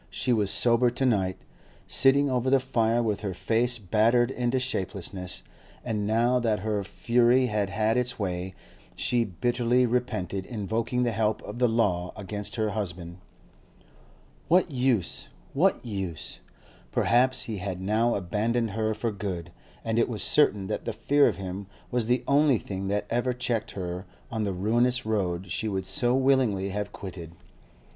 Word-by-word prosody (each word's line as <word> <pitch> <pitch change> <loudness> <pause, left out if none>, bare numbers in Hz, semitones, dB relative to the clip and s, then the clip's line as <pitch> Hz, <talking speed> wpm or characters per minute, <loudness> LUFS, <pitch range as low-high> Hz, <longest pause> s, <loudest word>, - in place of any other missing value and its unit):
She 125 - 0
was 105 -4 +1
sober 120 +2 +5
to 125 +3 -2
night, 95 -7 +1 0.5
sitting 140 +1 +4
over 130 -1 0
the 135 0 +5
fire 120 -2 +1
with 105 -3 -1
her 100 -4 -4
face 120 +5 +1
battered 115 +4 +2
into 125 0 0
shapelessness; 95 -6 -3 0.4
and 105 -4 -1
now 120 +3 +2
that 110 -4 0
her 105 -1 -1
fury 120 +5 +2
had 105 -4 -1
had 110 +3 +1
its 125 0 0
way, 95 -2 -3 0.4
she 120 -1 +1
bitterly 120 +5 +1
repented 100 -6 -2
invoking 115 +2 -1
the 120 - +1
help 110 -1 0
of 120 - -7
the 125 - +4
law 95 -6 0
against 105 0 -5
her 110 -2 0
husband. 90 -4 -5 1.3
What 175 0 +3
use? 125 -8 0 0.3
what 175 0 +2
use? 95 -7 -5 0.5
Perhaps 130 +2 +3
he 115 -5 -4
had 95 -1 -4
now 110 +5 +1
abandoned 110 +5 -1
her 110 +1 -1
for 115 +1 -2
good, 95 -4 -5 0.3
and 115 0 +1
it 115 - +2
was 110 -4 -2
certain 105 -10 +3
that 105 +2 -4
the - - -2
fear 145 0 +3
of 110 - 0
him 95 +1 -6 0.2
was 120 -2 0
the 125 +1 +1
only 140 -2 +4
thing 95 -2 -5
that 100 +1 -1
ever 120 +2 +1
checked 120 -3 -2
her 90 0 -5 0.2
on 110 -2 -1
the 100 - -1
ruinous 120 +7 +1
road 95 -4 -1
she 110 +5 -1
would 95 -3 -2
so 125 +3 +1
willingly 130 -8 +2
have 105 +1 -3
quitted. 85 -4 -8
110 Hz, 160 wpm, -27 LUFS, 100-125 Hz, 1.3 s, sober